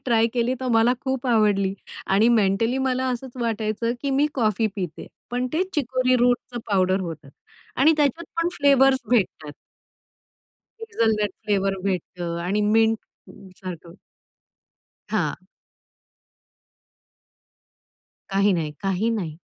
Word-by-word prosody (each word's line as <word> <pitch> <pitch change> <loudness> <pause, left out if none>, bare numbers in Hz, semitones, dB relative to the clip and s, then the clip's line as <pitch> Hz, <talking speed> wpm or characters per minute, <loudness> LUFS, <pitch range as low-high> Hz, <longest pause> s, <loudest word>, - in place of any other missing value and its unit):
Try 230 -2 +3
केली 245 +1 +1
तर 260 - -2
मला 225 +2 +4
खूप 265 -1 -3
आवडली 205 -5 +2 0.3
आणि 205 +5 +4
मेंटली 225 +3 +2
मला 260 -1 0
असंच 250 +1 -5
वाटायचं 225 0 -1
की 280 - -1
मी 275 +2 +3
कॉफी 220 -3 +1
पिते, 180 -5 -5 0.2
पण 245 +1 -1
ते 325 +4 +2
चिकोरी 255 -2 +1
रूटचं 245 0 +1
पावडर 190 -1 +2
होतं 165 -6 -7 0.5
आणि 295 +5 +5
त्याच्यात 295 +2 +1 0.2
पण 335 - +1
फ्लेव्हर्स 270 -2 +5
भेटतात. 185 -10 0 1.3
हेजलनट 220 - 0
फ्लेवर 195 -2 0
भेटतं 175 -2 -3
आणि 195 +4 0
मिंटसारखं. 190 -6 -3 1.2
हां. - - 0 2.9
काही 200 +1 +3
नाही, 165 -4 -1
काही 195 +3 0
नाही. 180 -9 -3
225 Hz, 110 wpm, -23 LUFS, 195-255 Hz, 2.9 s, आणि